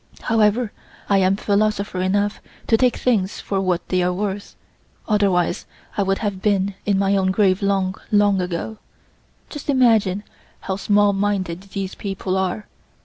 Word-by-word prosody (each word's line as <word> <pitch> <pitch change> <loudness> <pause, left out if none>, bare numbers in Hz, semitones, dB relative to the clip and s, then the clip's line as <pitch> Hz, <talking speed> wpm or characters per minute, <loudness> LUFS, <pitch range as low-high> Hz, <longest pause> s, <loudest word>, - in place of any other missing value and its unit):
However, 220 +1 +2 0.4
I 200 -1 +4
am 190 +1 +3
philosopher 205 -2 0
enough 200 +2 0 0.2
to 225 - +3
take 250 +2 +2
things 210 -6 0
for 195 -1 -2
what 180 -2 -1
they 185 -1 +2
are 180 0 +1
worth, 200 +2 -4 0.5
otherwise 200 -5 +1 0.3
I - - 0
would 195 0 +1
have 195 -2 -2
been 200 -1 +1
in 200 -2 +3
my 195 0 +2
own 190 -1 +2
grave 190 0 +2
long, 195 -2 +1 0.2
long 205 -2 +3
ago. 180 +5 -4 0.7
Just 295 -1 -8
imagine 220 -7 +3 0.4
how 190 - -3
small 205 0 +3
minded 195 -3 -1
these 195 -1 -5
people 195 -2 -3
are. 190 +2 -1
200 Hz, 150 wpm, -21 LUFS, 190-210 Hz, 0.7 s, I